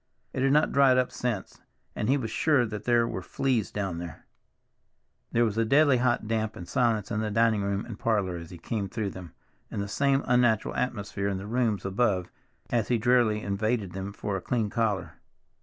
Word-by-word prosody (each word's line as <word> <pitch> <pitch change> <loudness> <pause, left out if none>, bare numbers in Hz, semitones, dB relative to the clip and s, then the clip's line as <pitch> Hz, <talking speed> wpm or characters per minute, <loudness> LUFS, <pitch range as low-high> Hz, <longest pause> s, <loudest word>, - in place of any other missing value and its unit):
It 130 - -2
had 135 +1 +3
not 150 +2 +3
dried 135 -2 +5
up 130 -1 +1
since, 120 -6 -4 0.3
and 105 - -1
he 140 - +4
was 115 -5 -4
sure 145 -3 +3
that 105 -2 -6
there 120 -1 +3
were 95 - -4
fleas 120 +4 -1
down 95 -5 -3
there. 85 -4 -8 1.1
There 120 +1 +3
was 110 0 -1
a - - +4
deadly 140 +3 +4
hot 120 -3 +1
damp 110 -1 -1
and 90 - -8
silence 115 -5 +1
in 105 - 0
the 110 - -1
dining 110 0 +2
room 100 0 -1
and 115 -4 -8
parlor 100 -6 0
as 85 -1 -9
he 90 - -9
came 100 +3 -3
through 105 -2 -3
them, 90 -4 -10 0.4
and - - -4
the 100 - -2
same 140 +6 +1
unnatural 120 -3 +2
atmosphere 100 -5 -2
in 100 -1 -1
the 95 - -7
rooms 110 -3 0
above 95 -2 0 0.4
as 115 -3 +1
he 120 - +2
drearily 115 -2 +2
invaded 105 0 -1
them 95 +2 -5
for 100 0 -4
a 95 - -3
clean 110 -2 -1
collar. 105 -8 -1
110 Hz, 205 wpm, -27 LUFS, 100-120 Hz, 1.1 s, dried